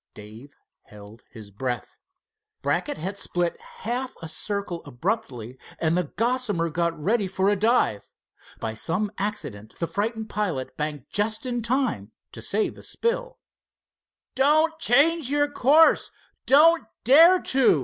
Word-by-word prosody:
Dave 110 +7 -13 0.3
held 105 +2 -14
his 110 -4 -12
breath. 120 +4 -5 0.6
Brackett 295 - -1
had 190 +5 -4
split 175 -1 -2
half 250 +4 -5
a 165 - -7
circle 180 +1 -4
abruptly, 130 - -4 0.2
and 160 0 0
the 180 -1 0
Gossamer 225 -8 0
got 170 0 -1
ready 205 +6 +1
for 190 +1 0
a 205 - +2
dive. 210 - +1 0.5
By 110 - -4
some 180 - -1
accident 140 - -5
the 170 - -1
frightened 220 +4 -3
pilot 180 -12 -3
banked 150 -3 -5
just 215 +3 0
in 245 -1 -2
time 230 - -1 0.2
to 115 - -9
save 210 - -1
a - - -11
spill. - - -3 1.0
"Don't 310 +4 +3
change 295 +2 +3
your 290 0 +2
course—don't 300 +1 +3 0.2
dare 330 +9 +7
to!" 260 - +3
205 Hz, 130 wpm, -24 LUFS, -, 1.0 s, dare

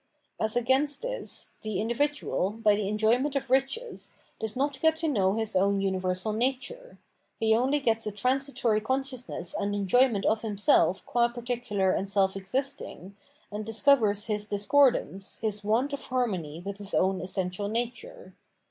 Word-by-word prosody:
As 220 +1 0
against 265 - +1
this, - - -3
the 215 -3 -3
individual, 240 -3 0
by 215 0 +2
the 205 -1 -2
enjoyment 235 +7 +2
of 270 -2 -2
riches, 270 - 0 0.2
does 220 -1 -3
not 275 +1 -1
get 320 0 +4
to 320 0 -2
know 200 -9 +2
his 220 -3 -2
own 200 +1 +3
universal 190 +1 -1
nature; 270 - -3 0.4
he 220 0 +3
only 265 +5 +2
gets 225 -5 0
a - - -1
transitory 250 0 0
consciousness 255 -6 -3
and 205 0 -1
enjoyment 205 +2 +3
of 220 0 +2
himself 205 -3 +2
qua 235 -1 +2
particular 240 -5 -1
and 195 +1 -1
self 195 -1 +2
existing, 200 -2 -4 0.4
and 210 +1 -4
discovers 220 -2 +3
his 210 -2 -2
discordance, 205 -2 +2
his 210 -2 -2
want 235 +7 +1
of 280 - -5
harmony 185 -11 -2
with 200 0 -5
his 205 0 -3
own 190 0 +2
essential 185 +2 -2
nature. 245 - -5
220 Hz, 150 wpm, -28 LUFS, 200-265 Hz, 0.4 s, get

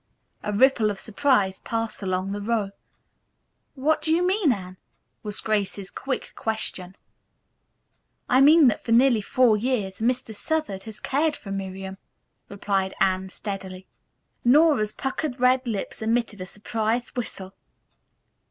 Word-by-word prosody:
A 210 - -3
ripple 225 0 +4
of 200 -2 -4
surprise 220 -5 +1
passed 225 -1 -3
along 185 0 -2
the 205 0 -4
row. 210 -2 -1 1.0
"What 300 +4 +1
do 315 - 0
you 345 +2 +3
mean, 370 -5 +3
Anne?" 185 -4 -5 0.4
was 210 -1 -2
Grace's 200 -2 -1
quick 270 -1 -4
question. 195 -4 -3 1.3
"I 255 +1 +4
mean 305 +2 +7
that 230 - +1
for 230 - 0
nearly 240 -2 +5
four 230 +1 +3
years 210 -5 -2
Mr. 240 0 0
Southard 210 -6 -2
has 220 -1 -9
cared 295 +3 0
for 200 - -9
Miriam," 190 0 -5 0.5
replied 195 -1 -1
Anne 190 0 +1
steadily. 190 -2 -6 0.6
Nora's 265 -4 +4
puckered 270 -1 -3
red 255 +1 +3
lips 215 -2 -4
emitted 225 -3 -1
a 185 - -5
surprised 220 +4 -2
whistle. 195 -6 -5
220 Hz, 135 wpm, -25 LUFS, 195-255 Hz, 1.3 s, mean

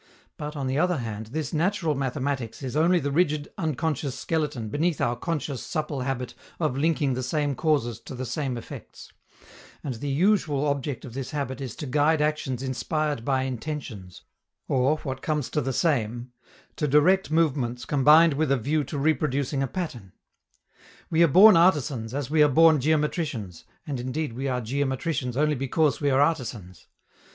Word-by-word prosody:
But, 150 +1 -6
on 140 -2 -3
the 130 +2 0
other 180 0 +2
hand, 110 -3 -5
this 150 +5 -4
natural 170 0 +1
mathematics 135 -2 -3
is 130 0 -4
only 170 +3 +4
the 145 -2 -2
rigid 150 -2 +1
unconscious 155 -5 -2
skeleton 150 -9 -2
beneath 155 +5 0
our 120 - +1
conscious 145 -1 -3
supple 150 -4 -3
habit 125 -2 -3 0.3
of 155 -6 0
linking 145 -1 +1
the 130 - -2
same 145 +2 -1
causes 135 -7 0
to - - -9
the 130 +1 -4
same 130 0 -3
effects; 115 - -10 0.7
and 135 - -3
the 130 +5 -5
usual 155 -2 +2
object 140 -2 -2
of 120 - -9
this 135 0 -5
habit 140 -2 -4
is 130 -3 -5
to - - -6
guide 150 +4 +2
actions 150 -4 -1
inspired 145 +1 -2
by 130 0 +1
intentions, 125 - -6 0.4
or, 135 +4 +2
what 135 -2 -4
comes 150 -4 -2
to 150 - 0
the 135 - -2
same, 120 -5 -1 0.5
to 150 - 0
direct 160 +7 +4
movements 135 -7 0
combined 150 +4 +5
with 150 0 0
a 140 - +4
view 145 +6 0
to 145 - -5
reproducing 140 -2 0
a 135 - 0
pattern. 120 - -6 1.0
We 165 0 +3
are 170 - +7
born 195 +7 +8
artisans 145 -9 +2
as 140 -3 -2
we 155 -1 +4
are 150 - +6
born 160 +2 +5
geometricians, 145 - -1 0.2
and 140 -4 -4
indeed 130 +2 -3
we 135 +4 -3
are 125 -1 -1
geometricians 130 +1 -2
only 150 +1 +2
because 135 0 0
we 145 - +2
are 135 0 +3
artisans. 120 - -2
145 Hz, 170 wpm, -26 LUFS, 130-155 Hz, 1.0 s, born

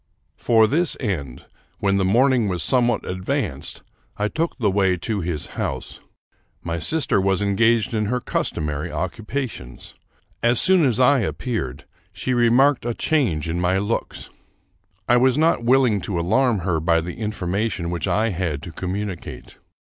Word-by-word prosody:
For 110 -2 +4
this 155 +8 +1
end, 75 - -4 0.3
when 100 -1 +1
the 95 - +1
morning 120 +4 +3
was 90 -4 -1
some 125 -2 +2
what 120 - -1
advanced, 95 - -3 0.3
I 105 +1 0
took 165 +5 -2
the 105 -6 +1
way 95 -2 +2
to 100 +4 -3
his 85 -4 -3 0.2
house. - - -4 0.6
My 85 0 -3
sister 145 - +1
was 95 +1 +1
engaged 110 +3 +2
in 105 -2 0
her 125 +4 0
customary 75 -10 -3
occupations. 110 - -5 0.5
As 120 0 +2
soon 185 -4 +4
as 125 -3 +1
I 130 -1 +4
ap - - -3
peared, 75 - -4 0.3
she 100 +7 -3
remarked 120 +3 +3
a 120 -1 -2
change 110 - 0
in 85 +2 -2
my 90 +1 +2
looks. 105 +4 -3 0.8
I 120 - +5
was 130 +2 +3
not 160 -5 +2
willing 125 -5 +3
to 90 -1 -3
alarm 110 +4 +2
her 85 -3 0
by 85 +1 +2
the 85 +2 -6
information 100 -3 -2
which 85 -3 -2
I 110 +2 +1
had 85 -7 -3
to 85 - -7
com 90 +3 -4
municate. 100 -4 -6
105 Hz, 165 wpm, -22 LUFS, 90-125 Hz, 0.8 s, I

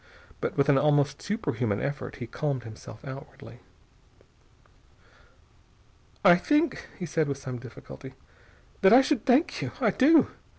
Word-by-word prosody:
But - - -4
with 140 0 +3
an 140 -2 +4
almost 145 -1 +1
superhuman 125 - -2
effort 140 0 -4
he 120 - -7
calmed 135 +1 -3
himself 110 +2 -12
outwardly. 135 -2 -11 2.7
"I 175 - +8
think," 300 - 0
he 180 - -5
said 160 -1 0
with 140 -1 -3
some 130 -2 -7
difficulty, 130 +2 -12 0.7
"that 190 +3 +6
I 255 - +9
should 270 -2 -1
thank 265 +6 +2
you. - - -5
I - - +2
do. 305 +4 +4
140 Hz, 135 wpm, -27 LUFS, 130-205 Hz, 2.7 s, I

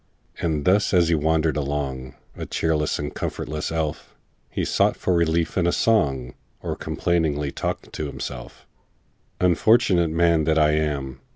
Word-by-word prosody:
And 80 -4 -1
thus 100 +1 +3
as 85 -2 +4
he - - +3
wandered 80 0 +1
along, 70 -3 -3 0.2
A - - -6
cheerless 75 -2 0
and 75 0 -4
comfortless 75 +1 -4
elf, 80 -2 -3 0.3
He - - -2
sought - - +2
for 90 - 0
relief 85 +1 +1
in 85 - +2
a - - +3
song, 70 - +1 0.3
Or - - -4
complainingly 75 -5 -1
talked - - -4
to 75 - -3
himself:— 65 -3 -8 0.7
"Unfortunate 90 -1 +3
man 85 -1 +2
that 80 0 +2
I 75 -1 +4
am! 70 -4 -2
80 Hz, 150 wpm, -23 LUFS, 75-85 Hz, 0.7 s, as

